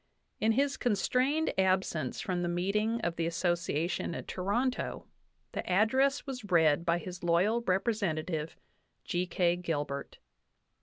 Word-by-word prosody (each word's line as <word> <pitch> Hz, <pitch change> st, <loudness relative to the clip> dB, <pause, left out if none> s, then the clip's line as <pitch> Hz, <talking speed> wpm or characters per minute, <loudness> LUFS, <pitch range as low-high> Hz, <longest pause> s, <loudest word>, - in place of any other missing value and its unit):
In 225 Hz, +1 st, +3 dB
his 275 Hz, +2 st, +1 dB
constrained 255 Hz, +8 st, +1 dB
absence 190 Hz, -4 st, +1 dB
from 180 Hz, -2 st, -2 dB
the 175 Hz, -, -1 dB
meeting 210 Hz, +6 st, 0 dB
of 170 Hz, -5 st, -2 dB
the 165 Hz, 0 st, 0 dB
Association 170 Hz, -1 st, -1 dB
at -, -, -6 dB
Toronto, 235 Hz, +8 st, -1 dB, 0.5 s
the -, -, -3 dB
address 260 Hz, +9 st, +3 dB
was 250 Hz, -5 st, -6 dB
read 160 Hz, -2 st, +4 dB
by 170 Hz, 0 st, +3 dB
his 180 Hz, 0 st, -8 dB
loyal 185 Hz, +7 st, +3 dB
representative, 185 Hz, -6 st, -1 dB, 0.5 s
G. 180 Hz, +1 st, -1 dB
K. 175 Hz, -1 st, +2 dB
Gilbert. 145 Hz, -5 st, -3 dB
185 Hz, 125 wpm, -31 LUFS, 170-225 Hz, 0.5 s, read